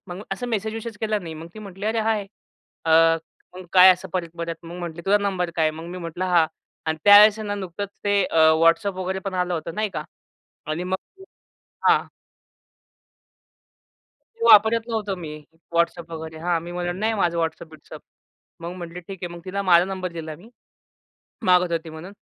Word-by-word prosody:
मग 180 Hz, +3 st, -7 dB
असं 220 Hz, +6 st, -4 dB
मेसेज-विसेज 220 Hz, 0 st, -3 dB
केला 215 Hz, -1 st, 0 dB
मी. 165 Hz, -5 st, -8 dB
मग 160 Hz, +2 st, -9 dB
ती 215 Hz, -, -10 dB
म्हटली, 200 Hz, 0 st, -7 dB
"अरे 225 Hz, +1 st, +1 dB
हाय!" 215 Hz, -2 st, 0 dB, 0.6 s
अ, -, -, +1 dB, 0.6 s
मग 185 Hz, 0 st, -10 dB
काय 185 Hz, 0 st, +9 dB
असं 185 Hz, +1 st, -8 dB
परत-परत? 170 Hz, -2 st, -4 dB
मग 170 Hz, +1 st, -9 dB
म्हटली, 170 Hz, -1 st, -6 dB
"तुझा 205 Hz, +1 st, +4 dB
नंबर 190 Hz, -4 st, -1 dB
काय 160 Hz, -, +2 dB
आहे?" 155 Hz, -, -4 dB
मग 165 Hz, -, -8 dB
मी 180 Hz, -, -6 dB
म्हटलं 170 Hz, +2 st, -4 dB
"हा." 175 Hz, -3 st, +4 dB, 0.4 s
आणि 160 Hz, 0 st, -1 dB
त्यावेळेस 205 Hz, +1 st, +8 dB
ना. 205 Hz, -1 st, -3 dB
नुकतंच 200 Hz, 0 st, -5 dB, 0.2 s
ते 200 Hz, -1 st, +3 dB
अ, -, -, -4 dB, 0.3 s
WhatsApp 195 Hz, +5 st, +4 dB
वगैरे 185 Hz, +1 st, -2 dB
पण 190 Hz, -, -7 dB
आलं 180 Hz, -1 st, 0 dB
होतं 165 Hz, 0 st, -5 dB
नाही 215 Hz, 0 st, -1 dB
का. 150 Hz, -, -3 dB, 0.6 s
आणि 155 Hz, +4 st, -3 dB
मग 185 Hz, +1 st, -1 dB, 0.9 s
हां. -, -, +4 dB, 2.3 s
ते 465 Hz, 0 st, -3 dB
वापरत 220 Hz, +2 st, +6 dB
नव्हतो 210 Hz, -4 st, -2 dB
मी 170 Hz, -4 st, -7 dB, 0.5 s
WhatsApp 170 Hz, 0 st, 0 dB
वगैरे. 160 Hz, 0 st, -7 dB
हां, 175 Hz, -2 st, +2 dB
मी 175 Hz, +1 st, -8 dB
म्हणलं, 175 Hz, +1 st, -3 dB
"नाही 220 Hz, +1 st, +1 dB
माझा 170 Hz, -2 st, +1 dB
WhatsApp-बिट्सअप." 160 Hz, -1 st, -5 dB, 0.6 s
मग 170 Hz, +2 st, -5 dB
म्हटले, 175 Hz, 0 st, -7 dB
"ठीक 185 Hz, +1 st, -10 dB
आहे." 175 Hz, 0 st, -5 dB
मग 170 Hz, -, -13 dB
तिला 200 Hz, +2 st, -3 dB
माझा 170 Hz, +1 st, +7 dB
नंबर 185 Hz, -2 st, -4 dB
दिला 160 Hz, -2 st, -6 dB
मी, 210 Hz, +8 st, -16 dB, 1.0 s
मागत 180 Hz, -1 st, +4 dB
होती 165 Hz, 0 st, -3 dB
म्हणून. 165 Hz, +5 st, -10 dB
180 Hz, 180 wpm, -23 LUFS, 170-205 Hz, 2.3 s, काय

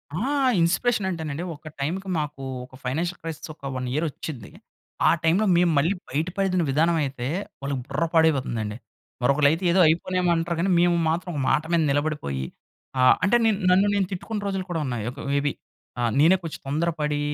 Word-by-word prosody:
ఆ! -, -, -2 dB, 0.4 s
ఇన్‌స్పిరేషనంటేనండి, 175 Hz, -4 st, 0 dB
ఒక 155 Hz, +1 st, -14 dB
టైముకి 185 Hz, +7 st, -3 dB
మాకు 150 Hz, -2 st, -4 dB, 0.2 s
ఒక 130 Hz, -, -16 dB
ఫైనాన్షియల్ 165 Hz, +8 st, -2 dB
క్రైసిస్ 165 Hz, -1 st, -6 dB
ఒక 140 Hz, -, -7 dB
1 125 Hz, 0 st, -3 dB
ఇయరొచ్చింది. 150 Hz, -5 st, -4 dB, 0.6 s
ఆ -, -, +7 dB
టై‌ములో, 180 Hz, +7 st, +3 dB
మేము 175 Hz, -1 st, +4 dB
మళ్ళీ 165 Hz, +8 st, +2 dB
బయటపడిన 180 Hz, +5 st, 0 dB
విధానమైతే 145 Hz, -4 st, +1 dB, 0.3 s
వాళ్ళకి 140 Hz, -1 st, -2 dB
బుర్ర 150 Hz, +4 st, -1 dB
పాడైపోతుందండి. 130 Hz, -10 st, +1 dB, 0.5 s
మరొకళ్ళైయితే 145 Hz, +6 st, +3 dB
ఏదో 185 Hz, -, +3 dB
అయిపోనేమో 180 Hz, +2 st, +1 dB
అంటారు 165 Hz, 0 st, -1 dB
గానీ 190 Hz, +2 st, +1 dB
మేము 175 Hz, 0 st, +4 dB
మాత్రం 175 Hz, +2 st, -2 dB, 0.2 s
మాట 135 Hz, -, +3 dB
మీద 165 Hz, -, +4 dB
నిలబడిపోయి, 145 Hz, -, -1 dB, 0.5 s
ఆ! -, -, +4 dB, 0.2 s
అంటే 205 Hz, -, +3 dB
నేను 215 Hz, -3 st, +2 dB
నన్ను 190 Hz, +3 st, +4 dB
నేను 195 Hz, -2 st, +1 dB
తిట్టుకున్న 205 Hz, +4 st, -4 dB
రోజులు 195 Hz, -1 st, -2 dB
కూడా 165 Hz, -, -1 dB
ఉన్నాయి. 120 Hz, -4 st, -3 dB
ఒక 140 Hz, -, -12 dB
మేబి 140 Hz, 0 st, +1 dB, 0.5 s
ఆ! -, -, 0 dB, 0.2 s
నేనే 165 Hz, +5 st, +6 dB
కొంచెం 165 Hz, -, -6 dB
తొందరపడీ 150 Hz, 0 st, -1 dB
160 Hz, 155 wpm, -24 LUFS, 140-180 Hz, 0.6 s, ఆ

